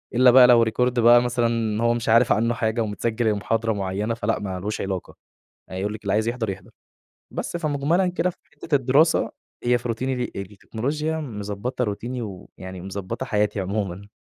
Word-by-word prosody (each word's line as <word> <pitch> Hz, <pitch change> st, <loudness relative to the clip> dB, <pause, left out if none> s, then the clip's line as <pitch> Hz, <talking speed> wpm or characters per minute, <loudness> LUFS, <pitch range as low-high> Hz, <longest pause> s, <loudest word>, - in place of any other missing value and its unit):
إلّا 125 Hz, 0 st, +7 dB
بقى 125 Hz, 0 st, +8 dB
لو 120 Hz, -2 st, +6 dB
Record 110 Hz, +2 st, -2 dB, 0.2 s
بقى 120 Hz, +1 st, +7 dB
مثلًا 115 Hz, -2 st, 0 dB
هو 115 Hz, 0 st, +3 dB
مش 115 Hz, -1 st, -3 dB
عارف 115 Hz, +2 st, +5 dB
عَنّه 115 Hz, +2 st, +2 dB
حاجة 115 Hz, +1 st, -1 dB
ومتسجل 110 Hz, +2 st, -1 dB
المحاضرة 110 Hz, +2 st, 0 dB
معيّنة 100 Hz, +3 st, -2 dB
فلأ، 115 Hz, -, -1 dB
ما 95 Hz, -3 st, -4 dB
لوش 105 Hz, +3 st, -3 dB
علاقة، 95 Hz, -2 st, -4 dB, 0.5 s
هيقول 95 Hz, +3 st, -3 dB
لِك 110 Hz, -, -9 dB
اللي 100 Hz, -2 st, -1 dB
عايز 110 Hz, +2 st, +1 dB
يحضر 115 Hz, -3 st, -2 dB
يحضر، 95 Hz, -1 st, -8 dB, 0.6 s
بس -, -, -4 dB
فمُجملًا 155 Hz, +3 st, +1 dB
كده 180 Hz, 0 st, 0 dB
في -, -, -11 dB, 0.2 s
حِتّة 155 Hz, -, -2 dB
الدراسة 140 Hz, +4 st, +3 dB, 0.3 s
هي 120 Hz, 0 st, +3 dB
في 120 Hz, +1 st, -6 dB
روتيني 130 Hz, +3 st, -1 dB
دي 125 Hz, -1 st, -3 dB
التكنولوجيا 135 Hz, -, -3 dB
مضبطة 110 Hz, -1 st, -4 dB
روتيني 120 Hz, +3 st, -3 dB
ويعني 95 Hz, -3 st, -8 dB
مضبطة 95 Hz, +5 st, -5 dB
حياتي 105 Hz, -3 st, 0 dB
عمومًا. 100 Hz, 0 st, -3 dB
115 Hz, 175 wpm, -23 LUFS, 105-125 Hz, 0.6 s, بقى